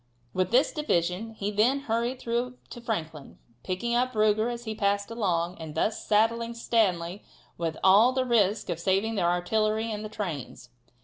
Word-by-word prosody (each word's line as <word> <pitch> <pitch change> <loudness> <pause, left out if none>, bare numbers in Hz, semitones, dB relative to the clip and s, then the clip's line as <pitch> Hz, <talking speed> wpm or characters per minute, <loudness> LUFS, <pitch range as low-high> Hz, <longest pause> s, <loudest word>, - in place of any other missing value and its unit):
With 185 -1 0
this 255 +5 +3
division 220 - -1
he 205 -1 -3
then 240 +7 +2
hurried 235 0 -1
through 245 +1 -2
to 240 - -8
Franklin, 160 - -5 0.3
picking 190 +6 -2
up 250 +1 +1
Ruger 215 +1 +2
as 240 0 -6
he 220 -2 -4
passed 200 0 0
along, 180 -6 -1
and 160 -2 -8
thus 210 +7 0
saddling 230 +2 +2
Stanley 195 -6 0 0.3
with 165 -2 -3
all 205 +6 +6
the 260 0 0
risk 215 -4 +2
of 170 - -3
saving 195 +5 +1
the 200 - -1
artillery 215 +6 +1
and 210 0 -4
the 215 - -6
trains. 165 -11 -6
215 Hz, 170 wpm, -27 LUFS, 185-235 Hz, 0.3 s, all